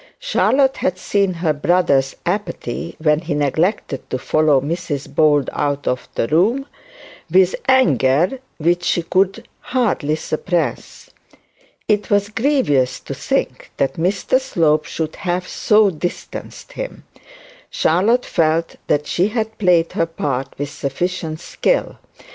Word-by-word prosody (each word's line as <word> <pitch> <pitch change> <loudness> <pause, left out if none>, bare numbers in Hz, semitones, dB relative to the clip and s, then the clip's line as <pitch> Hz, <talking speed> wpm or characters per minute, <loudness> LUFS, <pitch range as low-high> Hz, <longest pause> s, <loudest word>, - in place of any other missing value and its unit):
Charlotte 275 - +2
had 185 - -1
seen 200 +1 +1
her 170 -3 0
brother's 145 -4 +2
apathy, 170 - -3
when 150 -1 +3
he 160 -3 -3
neglected 150 - -1
to - - -1
follow 150 +1 +2
Mrs 145 -1 -3
Bold 145 -3 +3
out 145 -1 -2
of 125 0 -2
the 115 - 0
room, 220 - +2 0.6
with 185 +2 +4
anger 170 - +3 0.2
which 175 +2 +1
she 175 - +1
could 195 +6 0
hardly 205 - 0
suppress. 155 - -3 0.8
It 210 -1 +1
was 205 0 +2
grievous 220 - +1
to - - -6
think - - -2
that 135 - +1
Mr 195 +9 +1
Slope 155 -11 +1
should 160 -1 -4
have 180 -2 -2
so 210 -2 +3
distanced 175 +2 -6
him. - - -7 0.7
Charlotte 215 +10 +2
felt 165 0 0
that 150 0 +1
she 180 +5 +1
had 220 0 -3
played 175 -4 +3
her 165 - 0
part 135 -5 -3
with 145 0 -4
sufficient 160 +3 -3
skill. - - -1
170 Hz, 130 wpm, -19 LUFS, 150-205 Hz, 0.8 s, with